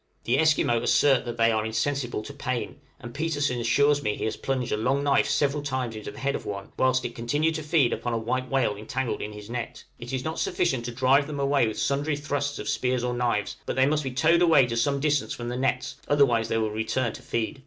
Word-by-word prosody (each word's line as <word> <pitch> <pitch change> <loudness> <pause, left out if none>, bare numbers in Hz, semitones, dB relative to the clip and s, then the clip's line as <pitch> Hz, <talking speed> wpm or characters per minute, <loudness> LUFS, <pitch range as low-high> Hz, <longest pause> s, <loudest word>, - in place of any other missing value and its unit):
The 125 +4 +1
Esquimaux 150 -7 +3
assert 135 -3 +3
that 120 -1 -5
they 115 0 +4
are 110 -1 0
insensible 120 +1 -2
to 140 - -9
pain; 130 -1 -4 0.2
and 120 0 -9
Petersen 145 -4 -1
assures 145 +5 +3
me 105 -4 -1
he - - -4
has 110 - -1
plunged 130 -2 -2
a - - +2
long 135 +6 0
knife 140 -1 +2
several 145 0 +1
times 130 -5 -3
into 110 - -6
the - - -11
head 140 +1 -1
of - - -4
one 100 -1 -6
whilst 130 0 +2
it 120 - -4
continued 145 +8 0
to 160 - -3
feed 150 -5 +2
upon 120 - -3
a - - +1
white 130 +3 -2
whale 135 -6 +1
entangled 120 +4 -3
in 105 - -4
his 105 -1 -10
net!! 120 0 -5 0.2
It 120 +1 -7
is 130 -1 -2
not 160 +3 -3
sufficient 135 -10 0
to 120 - -3
drive 130 +4 +3
them 150 -2 -5
away 140 -3 +2
with 110 - -4
sundry 145 +2 0
thrusts 145 0 -2
of - - -6
spears 125 -1 0
or 125 0 -1
knives, 120 -4 -1
but - - -2
they 130 - +4
must 150 +2 +1
be 135 - -2
towed 160 +7 +3
away 165 -6 +6
to 115 -1 -3
some 140 +4 +1
distance 145 -1 0
from 120 0 -5
the 120 - -3
nets, 135 +2 -1
otherwise 125 -6 +3
they 115 - 0
will 110 -1 0
return 110 +2 -1
to - - -10
feed. 115 +5 -3
130 Hz, 245 wpm, -26 LUFS, 115-145 Hz, 0.2 s, away